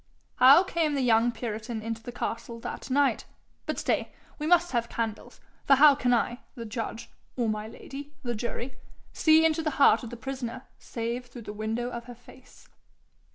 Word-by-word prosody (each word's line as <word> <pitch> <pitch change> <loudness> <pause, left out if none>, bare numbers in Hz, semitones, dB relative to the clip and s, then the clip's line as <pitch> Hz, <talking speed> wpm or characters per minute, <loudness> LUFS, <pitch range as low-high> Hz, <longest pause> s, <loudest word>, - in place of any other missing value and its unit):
How 270 +8 +8
came 325 -5 0
the 275 - 0
young 235 0 +4
puritan 225 -1 -5
into 225 0 -4
the 245 - -7
castle 230 0 -5
that - - -6
night? 280 +1 +2 0.4
But - - -2
stay: - - -1 0.3
we 300 - -2
must 350 +1 +4
have 235 -2 -1
candles, 225 -2 -4 0.2
for 275 - +6
how 290 +2 +8
can 250 -3 0
I, 240 0 +1 0.2
the 235 - -7
judge, 225 0 -5 0.2
or 240 -3 0
my 215 0 -2
lady, 275 +5 -9
the 240 -1 -2
jury, 240 +3 -5 0.4
see 320 0 +5
into 320 0 +2
the 315 - 0
heart 280 - +6
of 235 - -7
the 240 - -8
prisoner 255 0 -5 0.2
save 235 +2 -4
through 240 -1 -10
the 210 - -7
window 225 +3 -3
of 235 -1 -6
her 245 0 -10
face?' 245 +2 -18
240 Hz, 185 wpm, -28 LUFS, 230-275 Hz, 0.4 s, How